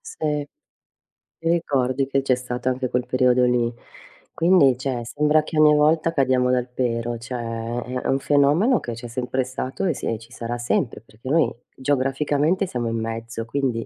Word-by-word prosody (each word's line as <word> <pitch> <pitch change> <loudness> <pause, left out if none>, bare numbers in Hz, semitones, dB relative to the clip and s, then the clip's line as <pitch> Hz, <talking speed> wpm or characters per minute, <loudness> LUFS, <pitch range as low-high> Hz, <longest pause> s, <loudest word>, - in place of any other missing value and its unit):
sì. 150 -2 -3 0.9
Ti 165 0 -2
ricordi 135 -5 +1
che 135 0 +1
c'è 130 -2 +2
stato 125 0 -3
anche 130 -1 -2
quel 125 0 -1
periodo 125 -1 +3
lì. 120 -1 +1 0.6
Quindi 165 -7 +4
cioè 130 -2 -3
sembra 150 +4 +2
che 155 - -5
ogni 150 0 +7
volta 155 +2 +3
cadiamo 130 -3 +2
dal 125 -1 +1
pero, 120 -1 -2
cioè. 115 0 -4 0.2
È - - -4
un 135 - +2
fenomeno 150 - +3
che 120 - -5
c'è 120 +1 -8
sempre 125 +2 -2
stato 130 +6 -4
e 175 - +2
si 115 -4 -3
ci 115 +1 -16
sarà 120 0 -4
sempre 120 -1 -1
perché 115 +3 -11
noi 160 +3 +3 0.3
geograficamente 145 +6 +1
siamo 120 -6 -2
in 115 0 -2
mezzo, 115 0 -5
quindi 120 -1 -1
130 Hz, 170 wpm, -23 LUFS, 120-145 Hz, 0.9 s, ogni